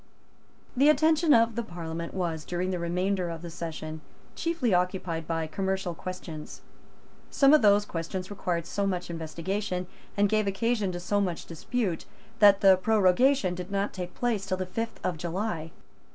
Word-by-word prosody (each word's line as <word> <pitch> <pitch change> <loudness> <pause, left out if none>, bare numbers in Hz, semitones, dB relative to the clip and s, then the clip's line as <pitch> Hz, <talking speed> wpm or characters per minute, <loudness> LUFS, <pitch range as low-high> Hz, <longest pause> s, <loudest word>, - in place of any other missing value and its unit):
The 275 +4 +5
attention 315 +2 +4
of 230 -2 +5
the 235 - -1
Parliament 170 -4 -6
was, 165 -4 -2
during 180 +3 -2
the 180 - -2
remainder 180 +2 0
of 165 0 -6
the 170 - -6
session, 160 -2 -6 0.3
chiefly 330 - 0
occupied 180 -2 0
by 165 -1 -1
commercial 190 +2 -2
questions. 170 -3 -7 0.7
Some 275 +1 +5
of 305 - +7
those 205 -1 +5
questions 180 +3 -5
required 175 -4 -2
so 200 +2 -1
much 180 -2 -2
investigation, 180 +4 -3 0.3
and 205 0 +4
gave 215 0 +1
occasion 210 0 0
to 175 - -4
so 205 +3 0
much 180 -4 -2
dispute, 180 +2 -2 0.3
that 205 -2 +7
the 190 -1 +7
prorogation 210 +2 +3
did 180 +1 -6
not 200 0 -1
take 180 -2 -6
place 225 -5 -1
till 185 -1 0
the 185 - -2
fifth 225 +5 -4
of 175 - -1
July. 170 0 -3
185 Hz, 165 wpm, -28 LUFS, 170-210 Hz, 0.7 s, of